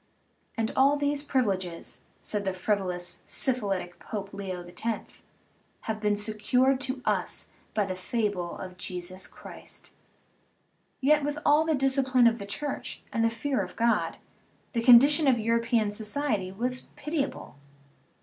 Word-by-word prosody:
"And 225 -1 0
all 275 +2 +5
these 285 0 +1
privileges," 195 - -1 0.2
said 210 -1 -1
the 190 -1 -1
frivolous, 180 -3 -2
syphilitic 200 -8 -1
Pope, 200 -2 -6
Leo 185 -3 -5
X., 225 +5 -5 0.6
"have 220 -1 -3
been 210 -1 +2
secured 225 +6 +2
to 260 -1 -2
us - - -1 0.3
by 210 -2 +2
the 190 - -3
fable 185 -2 -2
of 185 -1 -8
Jesus 180 +1 -4
Christ." - - -9 1.1
Yet, 295 +2 +4
with 290 +1 -1
all 300 +2 +5
the 320 -1 +2
discipline 265 -2 +3
of 235 0 +4
the 200 - -6
Church 285 +7 -4
and 230 - +1
the 230 - +4
fear 255 +4 -1
of - - -6
God, 235 +1 +1 0.6
the 230 - +1
condition 275 +5 +7
of 255 -3 +5
European 230 -1 +1
society 215 -2 -1
was 250 +6 -3
pitiable. 295 -1 -3
230 Hz, 140 wpm, -28 LUFS, 200-270 Hz, 1.1 s, condition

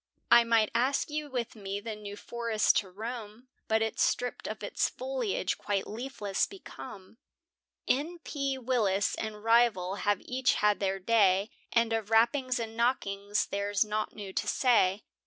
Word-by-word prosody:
I 235 - +9
might 230 -2 +3
ask 260 +5 +1
you 300 -1 -3
with 245 -3 -3
me 200 -1 -4
the 220 +1 -5
New 205 -1 -8
Forest 230 -1 +1
to 195 - -1
roam, 225 +3 -7 0.2
But 220 0 +2
it's 220 - -2
stript 245 0 0
of - - -6
its - - 0
foliage, - - -2
quite 200 -2 -1
leafless 215 -4 -2
become; 240 - -11 0.7
N.P. 285 -2 -1
Willis 225 -6 +1
and 215 -1 -5
rival 225 -5 +3
have 205 -1 +1
each 255 0 +1
had 210 0 +2
their 195 -1 0
day, 195 -1 +3 0.2
And 230 -1 +2
of 220 -2 -2
rappings 245 +3 +3
and 225 -1 -5
knockings 205 -4 0
there's 200 0 0
nought 215 0 -3
new 200 -3 -7
to - - -1
say. 210 -6 +3
225 Hz, 155 wpm, -30 LUFS, 205-250 Hz, 0.7 s, I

